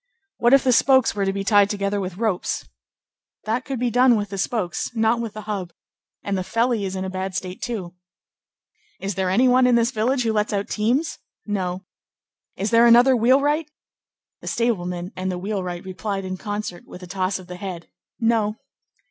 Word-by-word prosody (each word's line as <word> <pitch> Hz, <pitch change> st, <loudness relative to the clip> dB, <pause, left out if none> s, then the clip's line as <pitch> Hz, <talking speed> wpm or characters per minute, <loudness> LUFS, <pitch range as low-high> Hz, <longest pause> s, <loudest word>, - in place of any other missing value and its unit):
"What 240 Hz, +3 st, +5 dB
if 275 Hz, -, +3 dB
the 260 Hz, -, +3 dB
spokes 260 Hz, 0 st, +4 dB
were 200 Hz, -1 st, -1 dB
to 195 Hz, -, +1 dB
be 195 Hz, 0 st, -3 dB
tied 205 Hz, -1 st, +4 dB
together 200 Hz, 0 st, -1 dB
with 185 Hz, -1 st, -5 dB
ropes?" 215 Hz, -4 st, -1 dB, 0.8 s
"That 230 Hz, +4 st, -1 dB
could 270 Hz, -2 st, -3 dB
be 245 Hz, -1 st, 0 dB
done 245 Hz, 0 st, +5 dB
with 205 Hz, -2 st, -2 dB
the 195 Hz, -1 st, -5 dB
spokes, 195 Hz, -3 st, -1 dB
not 225 Hz, +1 st, +2 dB
with 230 Hz, -3 st, -5 dB
the 215 Hz, -, -7 dB
hub; 200 Hz, -5 st, -5 dB, 0.5 s
and 200 Hz, -, -1 dB
the 185 Hz, -, -1 dB
felly 230 Hz, +2 st, 0 dB
is 190 Hz, 0 st, -4 dB
in 190 Hz, 0 st, -3 dB
a -, -, -3 dB
bad 190 Hz, 0 st, -4 dB
state, 185 Hz, -1 st, -5 dB
too." 195 Hz, -8 st, -4 dB, 1.1 s
"Is 195 Hz, +1 st, -3 dB
there 190 Hz, 0 st, -1 dB
any 240 Hz, +8 st, +4 dB
one 250 Hz, 0 st, +5 dB
in 245 Hz, -, +4 dB
this 235 Hz, +1 st, +2 dB
village 250 Hz, +3 st, 0 dB
who 225 Hz, -1 st, 0 dB
lets 210 Hz, 0 st, 0 dB
out 200 Hz, 0 st, -2 dB
teams?" 245 Hz, +9 st, 0 dB, 0.3 s
"No." 190 Hz, -2 st, -3 dB, 0.7 s
"Is 200 Hz, +2 st, -2 dB
there 230 Hz, +1 st, +6 dB
another 245 Hz, +3 st, +7 dB
wheelwright?" 280 Hz, +6 st, +3 dB, 0.7 s
The -, -, -11 dB
stableman 180 Hz, -6 st, -1 dB
and 185 Hz, 0 st, -2 dB
the 180 Hz, -, -3 dB
wheelwright 180 Hz, -2 st, -4 dB
replied 195 Hz, +1 st, -4 dB
in 185 Hz, 0 st, -3 dB
concert, 205 Hz, -2 st, -5 dB
with 180 Hz, -, -11 dB
a -, -, -6 dB
toss 185 Hz, +1 st, -1 dB
of 185 Hz, -, -11 dB
the 180 Hz, 0 st, -8 dB
head. 180 Hz, -3 st, -6 dB, 0.3 s
"No." 225 Hz, -2 st, +1 dB
205 Hz, 195 wpm, -23 LUFS, 190-235 Hz, 1.1 s, another